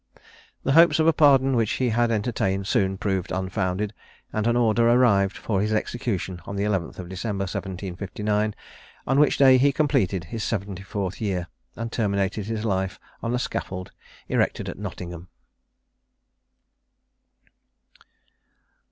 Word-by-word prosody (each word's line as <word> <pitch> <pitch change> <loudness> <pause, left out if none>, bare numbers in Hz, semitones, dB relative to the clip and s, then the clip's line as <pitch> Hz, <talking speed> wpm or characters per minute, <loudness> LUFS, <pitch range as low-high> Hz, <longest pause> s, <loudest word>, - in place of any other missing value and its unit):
The 135 - +1
hopes 165 +4 +6
of 160 - +3
a 165 - +5
pardon 135 -3 +5
which 115 -3 +1
he 130 -2 0
had 120 +1 +2
entertained 100 -3 0
soon 95 -1 +1
proved 95 -2 -2
unfounded; 95 +2 -2 0.4
and 110 +1 0
an 120 - +2
order 115 -1 +3
arrived 100 -6 +4
for 100 -4 -1
his 105 +1 0
execution 105 -5 -2
on 100 - -5
the 100 - -1
11th 95 -3 -2
December 95 +2 -3
1759, 100 +3 -3 0.5
on 135 +2 +2
which 150 - +4
day 130 -2 +7
he 140 +2 +4
completed 100 - +1
his 110 +7 -5
74th 100 -1 -3
year, 95 -5 -1 0.3
and 115 0 -5
terminated 100 -2 -1
his 110 -1 -3
life 95 -3 -1 0.2
on 115 +1 -1
a - - +1
scaffold 95 -6 -4 0.4
erected - - 0
at - - -6
Nottingham. 85 0 -7
105 Hz, 135 wpm, -25 LUFS, 95-120 Hz, 0.5 s, day